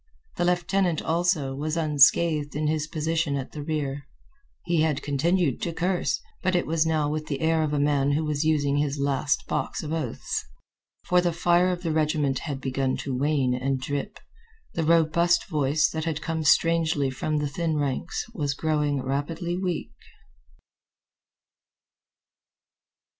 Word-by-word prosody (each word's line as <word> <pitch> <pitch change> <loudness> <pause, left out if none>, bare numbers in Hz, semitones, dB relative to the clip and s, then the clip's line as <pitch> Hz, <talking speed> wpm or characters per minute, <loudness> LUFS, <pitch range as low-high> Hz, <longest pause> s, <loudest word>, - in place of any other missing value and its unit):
The 175 - +1
lieutenant, 175 -1 +1
also, 165 -5 +1
was 155 +4 -3
unscathed 150 0 +3
in 150 +1 -1
his 155 0 0
position 160 -1 -1
at 135 -2 -4
the 150 - -6
rear. 145 -2 -3 0.6
He 170 -2 +2
had 155 -3 0
continued 150 +1 +1
to 170 - -2
curse, 180 +2 0 0.2
but 185 -1 +1
it 175 - +1
was 160 0 +1
now 155 -2 +1
with 155 +1 -3
the 140 -3 -3
air 160 0 +2
of 155 -2 0
a 150 - 0
man 145 -1 +2
who 155 +2 0
was 150 -1 -1
using 145 -3 +2
his 145 -1 0
last 140 +1 0
box - - -2
of 155 +1 -4
oaths. 150 -8 -3 0.6
For 180 0 +3
the 175 -1 +1
fire 175 +1 +3
of 180 -1 -3
the 165 - -1
regiment 150 -3 +1
had 140 -4 -5
begun 130 0 -1
to 135 -2 -4
wane 135 -1 +1
and 130 +1 -1
drip. 145 +10 -4 0.6
The 165 - -1
robust 170 +2 +3
voice, 150 -2 +2
that 160 0 -3
had 160 -2 -2
come 160 0 -3
strangely 160 -2 +3
from 150 +4 -2
the 150 0 0
thin 160 +2 -2
ranks, 145 +3 -2
was 145 -8 -2
growing 150 -3 0
rapidly 160 +6 -2
weak. 180 -3 -3
155 Hz, 160 wpm, -26 LUFS, 145-165 Hz, 0.6 s, unscathed